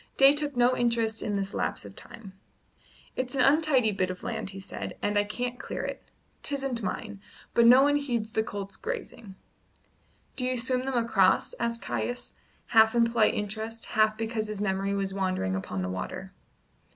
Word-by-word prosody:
Day 275 +1 +8
took 290 -3 -3
no 245 +1 +4
interest 230 -2 0
in 205 - -2
this 195 0 -2
lapse - - -2
of - - -11
time. 200 -4 -11 0.8
"It's 255 +1 -2
an 265 - +2
untidy 275 -6 +4
bit 185 -2 -1
of 185 0 -6
land," - - -3
he 195 0 -8
said, 190 - -7
"and 205 - -1
I 205 - +4
can't 245 +4 -4
clear - - -5
it. - - -5 0.4
'Tisn't 270 -4 -2
mine; 210 0 -4 0.3
but 235 0 +5
no 255 +3 +8
one 290 +1 +4
heeds 240 -6 -2
the 220 - +1
colts 200 -2 -6
grazing." 445 - -6 1.0
"Do 255 - -1
you 255 0 0
swim 255 +1 0
them 265 -2 -1
across?" 205 -5 +3
asked 235 -1 -2
Caius, 245 0 -3 0.4
half 220 0 +5
in 235 -1 +5
polite 230 -2 +2
interest, 220 +2 -4
half 215 -1 +3
because 225 -1 -2
his 210 -1 -5
memory 195 0 0
was 195 -1 -1
wandering 185 - -1
upon 95 0 -3
the - - -2
water. 95 0 -5
225 Hz, 180 wpm, -28 LUFS, 200-250 Hz, 1.0 s, Day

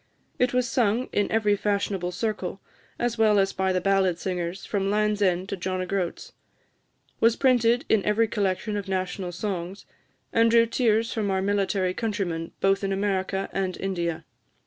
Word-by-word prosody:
It 250 0 +3
was 250 -1 +1
sung 235 0 +1
in 205 - +1
every 210 -2 +3
fashionable 200 -3 -1
circle, 195 -1 -3 0.4
as 240 -1 -2
well 215 -2 +5
as 195 -1 +2
by 190 0 0
the 185 - +1
ballad 190 -2 +2
singers, 180 0 -4
from 195 -2 -1
Land's 210 0 +1
end 185 -1 +1
to - - -2
John 185 0 -3
o' 185 - -2
Groat's; 185 -2 -3 0.9
was 230 0 +4
printed 245 0 +3
in 215 -3 +3
every 220 +2 +2
collection 205 0 -1
of 205 -1 -4
national 185 -1 -2
songs, 185 0 -4 0.5
and 230 0 +4
drew 230 0 +5
tears 230 -1 +1
from 210 -3 -1
our 190 0 0
military 195 -2 0
countrymen 185 -7 -3
both 195 +1 +2
in 195 - -1
America 195 -1 -1
and 190 -1 -2
India. 175 -4 -2
200 Hz, 170 wpm, -25 LUFS, 185-220 Hz, 0.9 s, well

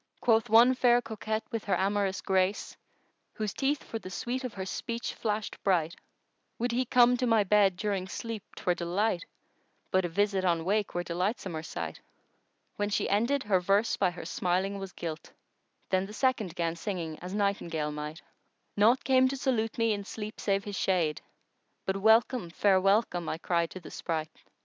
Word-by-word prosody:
Quoth 225 -2 +3
one 235 +4 +7
fair 245 -1 +4
coquette 220 -1 -3
with 230 -3 -3
her 200 - +1
amorous 195 0 0
grace 190 +1 0 0.3
* - - -45
Whose 215 -3 -3
teeth 280 +1 0
for 225 - -5
the 185 - -9
sweet 250 +6 -3
of 250 -4 -5
her 190 -1 -4
speech 230 +4 -4
flashèd 215 -1 -2
bright:— 170 -4 +1 0.6
Would 240 +1 -1
he 250 +2 +1
come 245 +1 +5
to 250 0 0
my 225 -2 +4
bed 200 -2 +3
during 195 -2 -2
sleep 225 +1 -5
'twere 180 - 0
delight 175 +2 -1 0.3
* - - -43
But 185 -1 +3
a 175 - -1
visit 200 +2 +1
on 170 -3 +1
wake 205 +1 0
were 175 - 0
delightsomer 180 -2 -2
sight! 85 - -6 0.8
When 205 0 0
she 205 - 0
ended, 235 +7 +2
her 200 -3 +2
verse 200 +5 +2
by 190 - +2
her 175 -1 -8
smiling 185 +3 -1
was 195 -1 -6
gilt: 165 -2 -6 0.3
* - - -45
Then 190 0 +2
the 210 - -10
second 220 -8 0
'gan 170 -2 -1
singing 170 -4 -4
as 185 +2 -6
nightingale 170 -7 -1
might:— 150 +2 -6 0.5
Naught 225 +5 +4
came 260 -1 +4
to 275 +1 -3
salute 225 -4 0
me 230 -2 +2
in 200 -1 -4
sleep 215 +1 -7
save 200 -1 0
his 205 -1 -5
shade 170 -6 +1 0.3
* - - -47
But 190 0 0
'welcome, 220 0 +3
fair 190 +2 +3
welcome,' 195 -3 +2
I - - -2
cried 170 -1 0
to 185 - -8
the 170 - -12
spright! 155 -1 -3
200 Hz, 190 wpm, -29 LUFS, 180-225 Hz, 0.8 s, one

